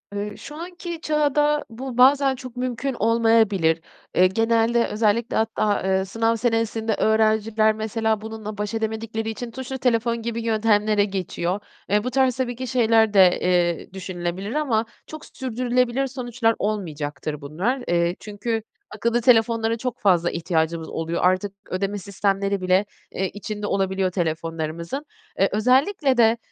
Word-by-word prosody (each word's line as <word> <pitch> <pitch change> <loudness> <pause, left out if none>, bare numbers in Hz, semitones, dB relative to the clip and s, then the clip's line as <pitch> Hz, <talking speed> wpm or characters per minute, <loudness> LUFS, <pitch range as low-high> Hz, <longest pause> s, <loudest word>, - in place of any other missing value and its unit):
Eee, 205 +1 -4
şu 295 - -10
anki 345 0 -7
çağda 295 -1 +1
bu, 245 +2 -7
bazen 270 +1 +5
çok 255 -1 -10
mümkün 255 +2 -2
olmayabilir. 220 -8 +3 0.3
Eee, 185 - +6
genelde 225 +3 +2
özellikle 220 +2 0
hatta, 215 -1 +1
eee, 190 0 +1
sınav 225 +3 0
senesinde 225 -1 0
öğrenciler, 220 0 +2
mesela, 220 0 -1
bununla 215 -1 -7
baş 210 +1 -3
edemedikleri 220 0 -3
için 230 +2 -6
tuşlu 260 +2 -5
telefon 235 -2 +1
gibi 230 0 -3
yöntemlere 215 -2 +2
geçiyor. 190 -1 -3 0.3
Eee, 210 +1 +2
bu 250 - -3
tarz 260 -1 +2
tabii 245 -2 -2
ki 255 +2 -5
şeyler 225 -3 +3
de, 185 -3 +6
eee, 175 0 +1
düşünülebilir 185 +2 -4
ama 245 -8 +1 0.2
çok 310 0 -9
s - - -16
sürdürülebilir 250 0 0
sonuçlar 240 -3 -1
olmayacaktır 155 -7 -3
bunlar. 190 - -2
Eee, 170 0 +1
çünkü 220 +2 -3 0.3
akıllı 235 +3 0
telefonlara 230 -1 +3
çok 250 0 -4
fazla 175 -4 +3
ihtiyacımız 165 -1 -1
oluyor. 165 +1 -3
Artık 185 +2 +1 0.2
ödeme 195 +2 -2
sistemleri 200 0 -1
bile, 185 +2 +3 0.3
eee, 190 0 -2
içinde 210 +1 -5
olabiliyor 190 -1 0
telefonlarımızın. 165 - -3 0.3
Eee, 195 - +4
özellikle 260 - +2
de, 230 0 +5
220 Hz, 140 wpm, -23 LUFS, 195-240 Hz, 0.3 s, Eee